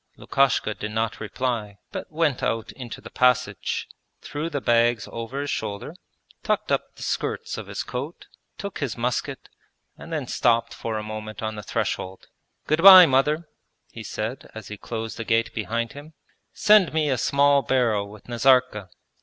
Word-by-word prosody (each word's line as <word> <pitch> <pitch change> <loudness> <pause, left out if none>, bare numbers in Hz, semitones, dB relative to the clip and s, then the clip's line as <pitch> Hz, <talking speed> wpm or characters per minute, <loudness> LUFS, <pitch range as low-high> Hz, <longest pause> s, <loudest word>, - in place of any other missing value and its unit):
Lukashka 135 -5 +1
did 105 - -6
not 110 +1 -1
reply, 110 -2 -3
but - - -6
went 155 -4 0
out 115 -1 -1
into 125 -4 -9
the - - -11
passage, 125 -5 +1 0.3
threw 150 +3 -4
the 145 -3 -2
bags 120 -1 +2
over 115 +4 -5
his 145 - -3
shoulder, 105 +7 -4 0.5
tucked - - -1
up - - -1
the - - -9
skirts - - -2
of - - -7
his - - -4
coat, - - -6 0.3
took 200 -1 -6
his 140 -5 -3
musket, 120 -1 -2 0.5
and 165 - -10
then 155 -4 -2
stopped 115 -1 +1
for 115 -2 -4
a 105 - -4
moment 110 0 -7
on 110 0 -2
the 105 - -6
threshold. 95 -1 -3 0.4
'Good 155 +2 +1
bye, 185 -1 +11
mother!' 150 +4 +1 0.4
he 115 - -9
said 110 +4 -5
as 110 -3 -8
he 105 - -6
closed 115 -1 -5
the 115 - -4
gate 115 0 +1
behind 115 +2 -2
him. 145 +3 -11 0.4
'Send 210 -6 +4
me 155 -1 +2
a - - +2
small 140 +2 +4
barrel 115 -7 +1
with 105 -1 -14
Nazarka. 120 -4 +2
120 Hz, 170 wpm, -24 LUFS, 110-140 Hz, 0.5 s, bye